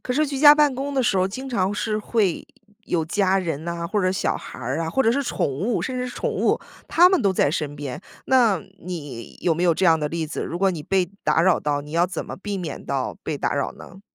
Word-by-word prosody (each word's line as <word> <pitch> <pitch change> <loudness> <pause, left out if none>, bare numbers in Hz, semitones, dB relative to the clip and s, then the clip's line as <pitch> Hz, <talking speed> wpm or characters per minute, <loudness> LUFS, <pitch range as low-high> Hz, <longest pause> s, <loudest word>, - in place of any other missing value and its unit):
可 250 - -2
是 305 +4 +2
居 275 -1 -4
家 295 +1 +9
办 295 -2 +4
公 280 +2 -4
的 265 - +2
时 205 - +2
候 185 - +3
经 260 +8 -6
常 195 -6 0
是 215 0 -1
会 210 -4 0 0.4
有 165 -2 0
家 190 +3 +2
人 160 -4 -3
呐， 170 0 -3
或 210 +4 0
者 185 -1 +1
小 - - 0
孩 - - -10
儿 130 +5 -2
啊， 160 - -2
或 265 +11 +1
者 225 - +3
是 265 +4 +1
宠 265 - -1
物 190 - -1
甚 255 -1 -3
至 250 - -2
是 - - -9
宠 - - -2
物， - - +1 0.3
他 355 +2 +6
们 375 -2 +2
都 200 -2 +2
在 160 - +2
身 150 -2 -3
边。 140 -1 -6 0.3
那 235 -9 +3 0.2
你 145 -9 -7
有 170 - +2
没 170 - -2
有 170 -2 +4
这 190 - 0
样 165 -2 +5
的 150 -1 -1
例 165 0 -2
子， 150 - -4
如 170 - -4
果 195 0 +3
你 170 -4 -5
被 185 +2 0
打 155 +2 +3
扰 185 -1 +4
到， 145 -1 -1
你 145 +1 -11
要 170 +2 +2
怎 185 - -5
么 - - -7
避 200 +1 -4
免 175 -4 -6
到 135 -2 -2
被 150 - -2
打 - - -1
扰 140 - -1
呢？ 185 +2 -13
185 Hz, 285 characters per minute, -23 LUFS, 160-230 Hz, 0.4 s, 家